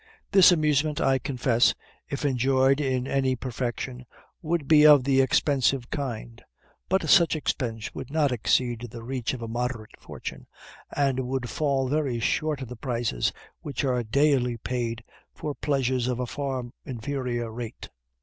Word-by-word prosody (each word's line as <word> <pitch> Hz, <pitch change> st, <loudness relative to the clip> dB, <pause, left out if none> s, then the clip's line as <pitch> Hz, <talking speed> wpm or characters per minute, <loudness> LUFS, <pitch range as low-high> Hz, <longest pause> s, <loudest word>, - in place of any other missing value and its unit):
This 190 Hz, -2 st, +8 dB
amusement, 150 Hz, -2 st, +2 dB
I 135 Hz, 0 st, +2 dB
confess, 125 Hz, -2 st, +2 dB, 0.3 s
if 140 Hz, +1 st, -3 dB
enjoyed 135 Hz, +1 st, +3 dB
in 130 Hz, -3 st, 0 dB
any 135 Hz, -1 st, +1 dB
perfection, 125 Hz, 0 st, -4 dB, 0.3 s
would 165 Hz, -3 st, -1 dB
be 150 Hz, -2 st, +6 dB
of 150 Hz, -3 st, +8 dB
the 135 Hz, 0 st, +3 dB
expensive 130 Hz, -1 st, +1 dB
kind; 120 Hz, -4 st, -5 dB, 0.5 s
but 190 Hz, +1 st, +1 dB
such 170 Hz, -3 st, +5 dB
expense 115 Hz, -7 st, -3 dB
would 130 Hz, -, -7 dB
not 150 Hz, -2 st, +1 dB
exceed 120 Hz, 0 st, 0 dB
the 115 Hz, 0 st, -9 dB
reach 130 Hz, 0 st, -3 dB
of 120 Hz, -, -8 dB
a -, -, -4 dB
moderate 120 Hz, -1 st, -3 dB
fortune, -, -, -8 dB, 0.4 s
and 135 Hz, -3 st, 0 dB
would 130 Hz, -2 st, -3 dB
fall 140 Hz, -3 st, 0 dB
very 140 Hz, -4 st, 0 dB
short 150 Hz, +4 st, 0 dB
of -, -, -7 dB
the 125 Hz, -, -7 dB
prices 115 Hz, -, -1 dB, 0.3 s
which 145 Hz, -, -4 dB
are 125 Hz, -2 st, +1 dB
daily 125 Hz, 0 st, +2 dB
paid 115 Hz, -1 st, -3 dB, 0.3 s
for 150 Hz, -, -4 dB
pleasures 130 Hz, -4 st, 0 dB
of 125 Hz, -1 st, -1 dB
a 125 Hz, -, -1 dB
far 135 Hz, 0 st, -3 dB, 0.2 s
inferior 125 Hz, -2 st, -3 dB
rate. 115 Hz, 0 st, -7 dB
130 Hz, 150 wpm, -26 LUFS, 120-140 Hz, 0.5 s, This